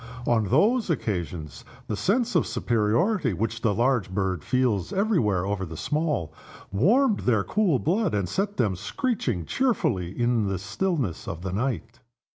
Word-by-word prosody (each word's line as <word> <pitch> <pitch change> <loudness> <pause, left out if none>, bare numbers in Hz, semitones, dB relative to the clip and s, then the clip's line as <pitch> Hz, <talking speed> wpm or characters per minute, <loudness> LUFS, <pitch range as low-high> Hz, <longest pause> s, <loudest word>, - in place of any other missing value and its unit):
On 115 -3 +2
those 210 - +3
occasions 90 - -3 0.2
the 105 - -3
sense 220 - +1
of 170 - +2
superiority 120 - +1
which 110 +4 -2
the 115 - +2
large 120 -1 +1
bird 95 -4 -1
feels 115 -8 0
every 205 0 +2
where 95 -5 +1
over 100 -1 -2
the 80 -3 -6
small, 150 - -1 0.4
warmed 210 - +3
their 110 -5 +2
cool 185 - +2
blood, 180 - 0
and 100 -3 0
set 200 - -2
them 105 -6 +1
screeching 120 - -2
cheerfully 155 - 0
in 120 -3 +2
the 95 -1 -1
stillness 110 - -2
of 85 -3 -5
the 95 -1 -3
night. 120 +1 -3
115 Hz, 155 wpm, -26 LUFS, -, 0.4 s, those